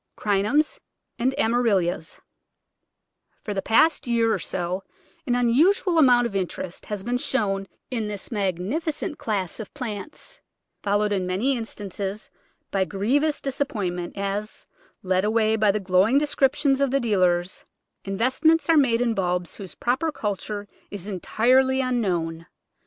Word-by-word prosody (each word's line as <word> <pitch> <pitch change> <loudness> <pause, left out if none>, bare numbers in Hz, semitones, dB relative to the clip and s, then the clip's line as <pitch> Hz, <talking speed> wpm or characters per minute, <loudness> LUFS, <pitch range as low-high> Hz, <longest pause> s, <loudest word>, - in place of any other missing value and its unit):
Crinums 210 +9 +1 0.4
and 260 +3 0
Amaryllis 205 -7 +1 1.2
FOR 210 - -3
the 195 - -1
past 275 +8 +3
year 230 -1 +2
or - - -1
so 185 +1 -3 0.4
an 245 - +2
unusual 320 - +3
amount 245 -4 +5
of 225 -4 -4
in 190 -2 +1
terest 175 +1 -8
has 205 -2 -5
been 245 +3 -1
shown 195 -7 -1 0.2
in 225 -4 -1
this 205 +1 -6
magnificent 235 - -2
class 200 -4 -2
of 215 - -7
plants, 250 +1 -6 0.4
followed 205 +1 +1
in 190 -3 0
many 220 +10 +1
instances 205 -3 -5 0.4
by 195 -1 +2
grievous 260 +11 0
dis 275 0 -4
appointment, 180 -10 -2
as, 200 +2 -3 0.4
led 185 0 +1
away 220 +1 +2
by 215 -1 +3
the 205 +2 +2
glowing 190 +6 +3
descrip 285 -2 +2
tions 275 -1 +2
of 275 - +3
the 275 +2 +2
dealers, 185 -6 +1 0.4
investments 260 - +2
are 325 - +6
made 240 -5 +3
in 240 -2 +2
bulbs 180 -3 -2
whose 195 -3 -8
proper 265 +7 0
culture 205 -3 -4 0.2
is 200 -3 -7
entirely 255 +7 +2
unknown. 180 -10 -1
215 Hz, 140 wpm, -24 LUFS, 195-255 Hz, 1.2 s, are